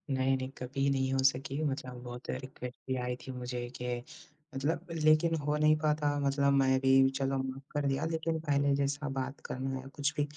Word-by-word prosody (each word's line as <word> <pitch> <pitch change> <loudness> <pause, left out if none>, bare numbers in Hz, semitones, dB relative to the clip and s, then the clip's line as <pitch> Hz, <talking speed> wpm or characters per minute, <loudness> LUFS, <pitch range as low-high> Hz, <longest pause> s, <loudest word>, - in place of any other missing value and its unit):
नहीं, 130 0 +2
नहीं 130 0 -4
कभी 135 +2 -1
नहीं 130 -1 +1
हो 135 - +1
सके 135 +1 -5
मतलब 130 -3 -3
बहुत 120 0 -8
रिक्वेस्ट 130 -1 -5
भी 130 - 0
आई 125 - -1
थी 130 - -5
मुझे 125 0 -3
कि 125 0 -1 0.6
मतलब 155 +6 -1 0.2
लेकिन 155 +2 +5
हो 150 0 +1
नहीं 155 0 +5
पाता 150 -1 +2
मतलब 140 0 +3
मैं 130 0 +3
भी 135 0 +5
चलो 135 0 +1
माफ़ 135 +1 -5
कर 145 -1 0
दिया 135 +3 0
लेकिन 160 0 -1
पहले 140 0 +3
जैसा 140 +1 -1
बात 135 +2 -4
करना 135 +1 -3
है 130 - -9
कुछ 145 +1 +1
भी। - - +4
135 Hz, 195 wpm, -32 LUFS, 130-145 Hz, 0.6 s, लेकिन